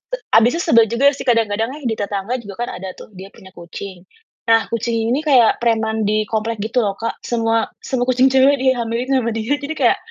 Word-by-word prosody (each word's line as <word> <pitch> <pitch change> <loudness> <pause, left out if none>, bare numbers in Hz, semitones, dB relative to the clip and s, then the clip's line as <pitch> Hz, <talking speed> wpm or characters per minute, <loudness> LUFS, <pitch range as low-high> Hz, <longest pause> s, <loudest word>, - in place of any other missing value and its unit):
E - - -10 0.2
abisnya 245 +9 +3
sebel 230 -1 +5
juga 265 +4 +1
sih, - - -6
kadang-kadang 225 0 +1
nih, 295 0 -10
di - - -1
tetangga 205 +3 -3
juga 200 -1 -9
kan - - -4
ada 190 0 -7
tuh - - -11
dia 190 +2 -10
punya 190 0 -15
kucing, 175 +1 -9 0.5
nah 225 0 +4
kucing 230 0 -2 0.2
ini 270 - +1
kayak 250 -5 +3
preman 220 -1 0
di 215 -1 0
komplek 225 0 -2
gitu 225 +3 0
loh 200 -1 -1
Kak, 230 0 -3
semua 225 -1 0
semua 250 -2 -2
kucing 255 +1 +4
cewek 270 +1 +4
dihamilin 245 -2 0
sama 235 -3 0
dia, 225 +6 -1
jadi 290 +1 -7
kayak - - +3
230 Hz, 210 wpm, -19 LUFS, 215-250 Hz, 0.5 s, sebel